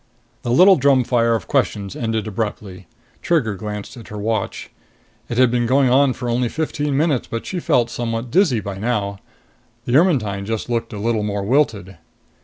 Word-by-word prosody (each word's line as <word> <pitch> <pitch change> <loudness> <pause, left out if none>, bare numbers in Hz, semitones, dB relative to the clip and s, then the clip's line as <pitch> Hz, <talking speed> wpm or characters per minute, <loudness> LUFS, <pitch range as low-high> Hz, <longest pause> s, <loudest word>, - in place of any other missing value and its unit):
The 120 - -5
little 185 +10 +6
drumfire 125 -4 +3
of 110 - -5
questions 100 -2 -1
ended 110 -2 -2
abruptly. 100 -4 -5 0.3
Trigger 140 -11 +1
glanced 105 +1 -6
at 115 - -11
her 105 - -8
watch. 110 +2 -3 0.6
It 120 - -3
had 130 -2 +4
been 120 -1 +1
going 130 0 +3
on 135 0 +4
for 125 - -6
only 120 0 0
fifteen 150 -2 -2
minutes, 150 -4 +1
but 115 - -5
she 185 - -3
felt 120 -7 +1
somewhat 115 0 -3
dizzy 155 - +3
by 100 -1 -6
now. 100 -3 -2 0.7
The 120 - 0
Ermetyne 110 - +2
just 115 +2 -3
looked 115 -1 -2
a 105 - -6
little 110 +1 0
more 100 -1 -2
wilted. 105 - 0
115 Hz, 175 wpm, -20 LUFS, 105-130 Hz, 0.7 s, little